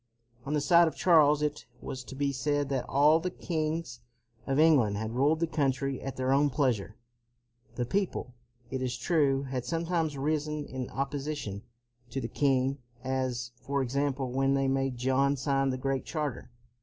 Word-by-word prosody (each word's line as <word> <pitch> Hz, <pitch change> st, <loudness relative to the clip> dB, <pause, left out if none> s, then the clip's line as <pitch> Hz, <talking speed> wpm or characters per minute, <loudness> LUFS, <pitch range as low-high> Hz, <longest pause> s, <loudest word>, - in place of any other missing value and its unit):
On 145 Hz, -, -1 dB
the 150 Hz, -, +1 dB
side 170 Hz, +3 st, +6 dB
of 160 Hz, -, -3 dB
Charles 150 Hz, -4 st, +5 dB
it 150 Hz, -2 st, -2 dB
was 130 Hz, +1 st, -6 dB
to 135 Hz, -, -9 dB
be 140 Hz, +1 st, 0 dB
said 145 Hz, +1 st, -1 dB
that 135 Hz, -3 st, -2 dB
all 150 Hz, +4 st, +5 dB
the 180 Hz, +2 st, -2 dB
kings 160 Hz, -6 st, -3 dB, 0.5 s
of 135 Hz, 0 st, 0 dB
England 140 Hz, -10 st, +4 dB
had 110 Hz, +1 st, -3 dB
ruled 145 Hz, +6 st, +2 dB
the 170 Hz, -, +2 dB
country 135 Hz, -4 st, -1 dB
at 135 Hz, -, -5 dB
their 130 Hz, 0 st, 0 dB
own 145 Hz, +2 st, +4 dB
pleasure. 120 Hz, -7 st, 0 dB, 0.8 s
The 120 Hz, -, -1 dB
people, 185 Hz, -, -2 dB, 0.4 s
it 130 Hz, -1 st, -2 dB
is 125 Hz, -2 st, -2 dB
true, 140 Hz, 0 st, +2 dB
had 130 Hz, -2 st, -3 dB
sometimes 165 Hz, -2 st, -1 dB
risen 150 Hz, +1 st, -1 dB
in 130 Hz, -2 st, -5 dB
opposition 140 Hz, -6 st, -3 dB, 0.5 s
to 135 Hz, -, -3 dB
the 115 Hz, -, -3 dB
king; 135 Hz, 0 st, +1 dB, 0.2 s
as, 130 Hz, -3 st, -2 dB
for 140 Hz, -1 st, -1 dB
example, 135 Hz, 0 st, -1 dB
when 135 Hz, +1 st, +2 dB
they 135 Hz, 0 st, +1 dB
made 135 Hz, -1 st, 0 dB
John 135 Hz, +3 st, +2 dB
sign 135 Hz, 0 st, +1 dB
the 130 Hz, -, -1 dB
Great 135 Hz, 0 st, -1 dB
Charter. 150 Hz, -7 st, -4 dB
135 Hz, 170 wpm, -29 LUFS, 130-150 Hz, 0.8 s, side